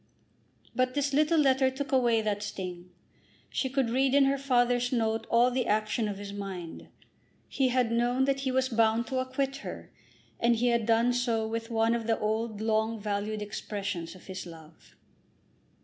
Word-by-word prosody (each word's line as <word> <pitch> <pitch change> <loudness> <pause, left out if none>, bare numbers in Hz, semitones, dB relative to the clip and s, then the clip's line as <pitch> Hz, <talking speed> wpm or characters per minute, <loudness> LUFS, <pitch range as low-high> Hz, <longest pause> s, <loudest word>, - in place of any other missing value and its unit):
But 255 0 +1
this 285 -1 0
little 310 +3 +3
letter 265 -2 +4
took 270 +1 -5
away 240 -4 +3
that 205 -1 -1
sting. 180 -3 -6 0.6
She 265 - -1
could 260 -3 0
read 265 +2 +2
in 280 -1 +6
her 275 +1 +2
father's 245 -2 +2
note 225 -2 0
all 240 +2 +4
the 250 -1 -1
action 215 +1 0
of 205 -1 -4
his 200 0 -7
mind. 190 -4 -7 0.6
He 270 - +1
had 250 -2 +1
known 245 +3 +2
that 275 0 0
he 270 -1 -1
was 260 0 +1
bound 225 -1 +2
to 260 - -1
acquit 265 +1 -2
her, 275 - -8 0.5
and 235 0 +3
he 245 +2 +1
had 235 -2 +1
done 230 +2 +3
so 235 -3 0
with 225 +1 -4
one 225 0 +2
of 230 -1 -2
the 225 - +2
old 215 0 -2
long 220 0 0
valued 210 +1 -2
expressions 200 -4 -5
of 185 - -15
his 190 -1 -7
love. 160 -1 -15
230 Hz, 180 wpm, -29 LUFS, 215-260 Hz, 0.6 s, in